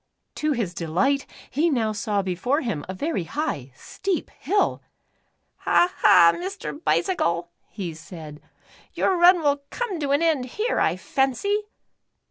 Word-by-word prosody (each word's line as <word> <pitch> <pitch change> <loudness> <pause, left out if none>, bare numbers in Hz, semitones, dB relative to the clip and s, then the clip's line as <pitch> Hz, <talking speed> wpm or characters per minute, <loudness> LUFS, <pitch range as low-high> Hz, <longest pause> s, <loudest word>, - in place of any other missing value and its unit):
To 305 0 0
his 220 -9 -2
delight, 185 - 0 0.2
he 310 +6 +2
now 230 -7 +1
saw 205 -1 -1
before 195 - 0
him 215 - -3
a - - -3
very 280 - -2
high, 165 - -3
steep 370 - -3
hill. 400 +8 0 0.4
" - - -47
Ha, 360 +1 +2
ha, 170 0 +7
Mr. 365 -3 -6
Bicycle," 175 - 0 0.4
said 155 -2 -10 0.5
he, - - -13
"your 380 - +3
run 350 -1 +6
will 285 -1 +2
come 460 -8 -3
to 290 -2 -2
an 285 +4 +2
end 310 -6 +2
here, 425 - -1
I - - +2
fancy." 400 - 0
280 Hz, 145 wpm, -24 LUFS, -, 0.5 s, ha